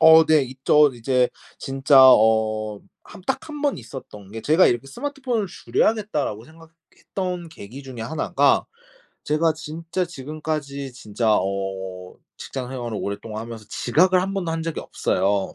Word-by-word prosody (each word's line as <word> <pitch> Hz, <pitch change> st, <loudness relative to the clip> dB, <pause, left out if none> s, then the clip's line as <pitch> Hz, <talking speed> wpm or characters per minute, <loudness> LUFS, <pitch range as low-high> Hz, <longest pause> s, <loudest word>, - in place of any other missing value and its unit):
어 160 Hz, 0 st, +8 dB
네 155 Hz, -2 st, +5 dB
있죠. 135 Hz, +3 st, +3 dB
이제 125 Hz, +1 st, +1 dB, 0.3 s
진짜 135 Hz, +1 st, +3 dB
어 110 Hz, -3 st, +4 dB, 0.3 s
한 -, -, -12 dB
딱 265 Hz, -, 0 dB
1 295 Hz, -1 st, -7 dB
번 285 Hz, -2 st, +1 dB
있었던 105 Hz, -7 st, -10 dB
게 115 Hz, -, -5 dB
제가 160 Hz, +9 st, +5 dB
이렇게 120 Hz, +2 st, 0 dB
'스마트폰을 255 Hz, -, -3 dB
줄여야겠다.'라고 180 Hz, -, -1 dB
생각했던 165 Hz, +3 st, -7 dB
계기 130 Hz, -1 st, -10 dB
중의 125 Hz, -4 st, -7 dB
1 155 Hz, +7 st, -4 dB
가 -, -, +4 dB, 0.6 s
제가 155 Hz, +2 st, +2 dB
진짜 165 Hz, +3 st, -4 dB
지금까지 150 Hz, -3 st, -5 dB
진짜 110 Hz, -2 st, -1 dB
어 95 Hz, -1 st, -4 dB, 0.2 s
직장 130 Hz, -2 st, -6 dB
생활을 120 Hz, -4 st, -4 dB
오랫동안 105 Hz, +2 st, -5 dB
하면서 115 Hz, -2 st, -8 dB
지각을 180 Hz, +12 st, +3 dB
1 195 Hz, +1 st, -3 dB
번도 180 Hz, -4 st, -2 dB
한 165 Hz, 0 st, -2 dB
적이 165 Hz, -1 st, -3 dB
없어요. 95 Hz, +1 st, 0 dB
135 Hz, 295 characters per minute, -23 LUFS, 110-165 Hz, 0.6 s, 어